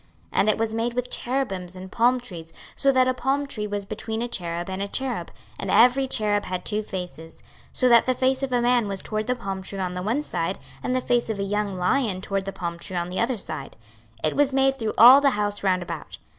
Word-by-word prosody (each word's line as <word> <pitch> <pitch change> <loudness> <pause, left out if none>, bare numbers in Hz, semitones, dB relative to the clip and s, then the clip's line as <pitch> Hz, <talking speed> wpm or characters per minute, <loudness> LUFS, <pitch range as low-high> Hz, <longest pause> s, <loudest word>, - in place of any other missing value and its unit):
26:041:018 - - +1
And 215 - +4
it 215 - +2
was 220 0 -1
made 230 +1 -1
with 250 0 -2
cherubims 195 -9 -2
and 185 0 -9
palm 245 +2 +3
trees, 170 -9 -9 0.2
so 275 - +3
that 260 -1 +3
a 255 - +2
palm 270 +3 0
tree 215 -6 -4
was 205 -1 -3
between 220 +2 -4
a - - -2
cherub 175 -6 -3
and 190 0 -4
a 200 - -1
cherub; 260 +4 -3 0.3
and - - -4
every 250 +3 +5
cherub 210 -4 +1
had 180 -1 -4
two 210 0 -1
faces; 180 -5 -7
26:041:019 - - -22 0.3
So 255 - +3
that 235 -1 +6
the 255 - +3
face 260 +1 +1
of 270 -1 -2
a 245 -1 +2
man 240 -2 +3
was 195 -1 -4
toward 215 0 -3
the 250 - +1
palm 195 -5 -5
tree 195 +1 -6
on 185 -2 -2
the 180 - -4
one 230 +10 0
side, 175 - -2 0.2
and 255 - -1
the 255 - +1
face 240 -2 +1
of 220 - -2
a 200 - -2
young 205 -1 -2
lion 185 +2 +1
toward 195 0 -3
the 195 - -3
palm 170 -2 -5
tree 185 - -5
on 175 0 -2
the 185 - -3
other 235 +1 0
side: 155 -8 -7 0.5
it 155 - +1
was 285 -1 +3
made 270 0 +2
through 220 -2 -2
all 255 +5 +10
the 280 - +5
house 205 0 -1
round 185 -2 +1
about. 165 -3 -7
215 Hz, 255 wpm, -24 LUFS, 185-250 Hz, 0.5 s, all